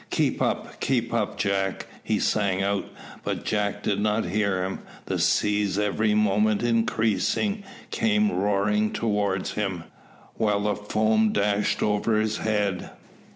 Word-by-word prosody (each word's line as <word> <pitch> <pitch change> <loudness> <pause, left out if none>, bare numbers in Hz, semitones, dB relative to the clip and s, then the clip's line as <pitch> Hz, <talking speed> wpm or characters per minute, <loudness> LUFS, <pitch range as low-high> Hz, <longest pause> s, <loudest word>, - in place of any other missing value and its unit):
"Keep - - 0
up! - - -2
keep 120 -3 0
up, 115 -3 -1
Jack!" 95 -1 -1 0.2
he - - 0
sang 95 -3 +1
out, 100 0 0 0.4
but - - -3
Jack 105 -1 -1
did 100 -1 0
not 105 +1 +1
hear 95 0 0
him. 95 +1 -3 0.3
The - - -2
seas, 105 -2 +2
every 105 +1 +1
moment 105 +1 +2
increasing, 115 - +1 0.3
came 215 -2 +2
roaring 105 - +1
towards 105 -4 0
him, 95 -5 -2 0.5
while 105 -2 +1
the 105 0 0
foam 110 +1 +1
dashed 105 0 +1
over 105 +1 +1
his 110 0 0
head. 105 -4 -1
105 Hz, 135 wpm, -25 LUFS, 100-110 Hz, 0.5 s, seas